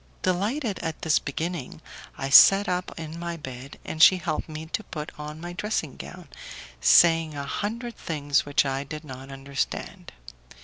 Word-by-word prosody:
Delighted 205 - -1
at 165 -2 -5
this 160 -2 +3
beginning, 160 0 -5 0.4
I 135 0 -4
sat 195 +7 +8
up 180 0 -2
in 160 +1 -7
my 170 0 -4
bed 130 -2 -9
and 155 - -4
she 185 - +8
helped 160 -3 -3
me 155 +1 -6
to 215 +7 -4
put 155 -4 -6
on 150 +1 -7
my 175 +1 -7
dressing 175 -7 -3
gown, 180 -3 -10 0.5
saying 165 - +5
a 140 - -4
hundred 230 - -4
things 145 -3 0
which 145 0 +1
I 135 0 -2
did 155 +2 -8
not 135 -1 -9
understand. 135 0 -5
160 Hz, 165 wpm, -26 LUFS, 145-180 Hz, 0.5 s, sat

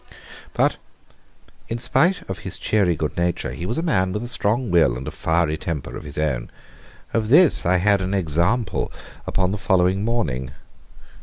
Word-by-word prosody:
But, - - +2 0.9
in 115 - -3
spite 135 +10 +1
of 95 - -5
his - - -6
cheery 95 -5 +1
good 75 -1 -3
nature, 85 0 -1
he 85 - -5
was 115 - -2
a 165 - -1
man 95 - +1
with 105 - -3
a - - -5
strong 120 -1 0
will 80 -9 +3
and 65 - -7
a - - -3
fiery 80 -1 0
temper 80 -4 -5
of - - -8
his 75 - -8
own. 65 -6 -1 0.6
Of 110 -2 0
this 155 - +5
I 90 +1 +4
had 100 +2 +3
an 95 +2 -1
example 95 +5 0 0.4
upon 95 -1 0
the 105 - -3
following 95 0 +2
morning. 75 - -1
95 Hz, 175 wpm, -22 LUFS, 80-115 Hz, 0.9 s, this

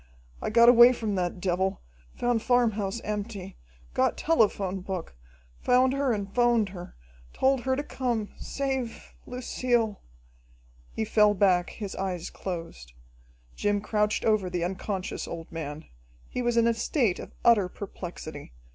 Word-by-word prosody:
I - - -2
got 235 +2 +6
away 240 +1 +9
from 220 -4 -3
that 180 -1 -1
devil, 190 +1 0 0.4
found 240 -2 +1
farmhouse 230 -4 +1
empty, 205 -2 -5 0.4
got - - +1
telephone 205 - +1
book, 185 - -5 0.4
found 255 +1 +3
her 275 -1 +1
and 200 -3 -3
'phoned 240 -4 +3
her. 180 -2 -9 0.4
Told 265 -1 +2
her 260 0 +2
to 285 - -2
come. 240 -7 -2
Save 265 -4 -4
Lucille!" 245 -3 -1 0.9
He 220 - -2
fell 210 -1 +4
back, 180 -3 +3
his 205 -4 -6
eyes 185 -3 -3
closed. 165 - -7 0.6
Jim 205 0 +1
crouched 210 0 0
over 215 -4 +2
the 180 -1 -2
unconscious 190 +1 -3
old 165 -1 -7
man. 155 -2 -6 0.4
He 250 - -4
was 240 -1 0
in 230 - +5
a 235 - +3
state 230 - 0
of - - -9
utter 210 -6 +5
perplexity. 170 - -8
210 Hz, 140 wpm, -27 LUFS, 185-240 Hz, 0.9 s, away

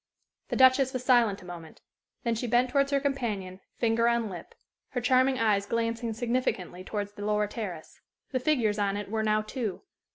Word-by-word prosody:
The - - -2
Duchess 260 0 +5
was 255 -1 -4
silent 230 -6 +3
a - - -13
moment. 170 -3 -10 0.4
Then 235 - +1
she 230 +2 -3
bent 245 +2 +2
towards 275 +1 +2
her 280 -1 +2
companion, 220 -10 -2 0.2
finger 230 0 +2
on 235 -3 +1
lip, 175 - -9 0.4
her 250 - 0
charming 255 +2 +3
eyes 205 -3 +2
glancing 230 0 -1
significantly 225 -6 -2
towards 205 +1 -4
the 205 0 -9
lower 210 0 +1
terrace. 200 -7 -7 0.3
The 260 - 0
figures 240 -7 +1
on 200 0 0
it 205 -1 -6
were 220 0 0
now 215 0 +2
two. 215 -5 -4
225 Hz, 185 wpm, -28 LUFS, 205-250 Hz, 0.4 s, Duchess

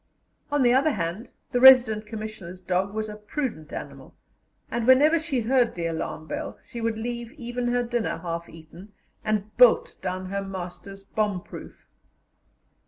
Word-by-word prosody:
On 290 -2 +2
the 245 0 +5
other 275 +4 +4
hand, 180 +4 -4 0.2
the 245 - +1
Resident 245 -5 +7
Commissioner's 215 -5 -7
dog 185 +1 -1
was 215 +1 -3
a 210 - -7
prudent 210 - -5
animal, - - -8 0.6
and 235 0 -2
whenever 295 +6 +6
she 300 -6 -1
heard 245 +1 +2
the 170 -1 -3
alarm 160 -1 -4
bell, - - -5
she 235 -2 -7
would 225 -1 -1
leave 235 +1 -5
even 245 -3 -4
her 245 0 +1
dinner 240 -1 -2
half 170 0 -5
eaten, 170 +5 -14 0.3
and 215 -1 -2
bolt - - +5
down 185 +1 -3
her 200 0 -1
master's 195 +1 -8
bomb 205 -2 -1
proof. - - -11
220 Hz, 160 wpm, -25 LUFS, 185-245 Hz, 0.6 s, Resident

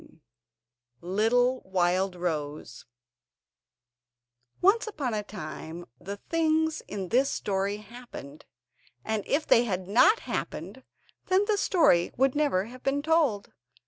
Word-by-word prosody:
] 120 +1 -50 0.2
Little 245 +3 +3
Wildrose 175 -7 -1 1.7
Once 410 +5 +3
upon 285 - -3
a 210 - -1
time 170 -3 -8
the 200 +3 -6
things 320 +3 0
in 190 -3 -5
this 265 +4 +3
story 200 0 -1
happened, 210 - -11 0.6
and 220 -2 -1
if 300 +2 +1
they 235 - +5
had 185 -4 -3
not 250 - +5
happened 200 +11 -5 0.4
then 380 +2 +3
the 425 0 +2
story 330 - +3
would 265 +1 +3
never 285 -11 +1
have 250 +3 -12
been 280 +1 0
told. 305 -11 +1
215 Hz, 115 wpm, -28 LUFS, 180-285 Hz, 1.7 s, they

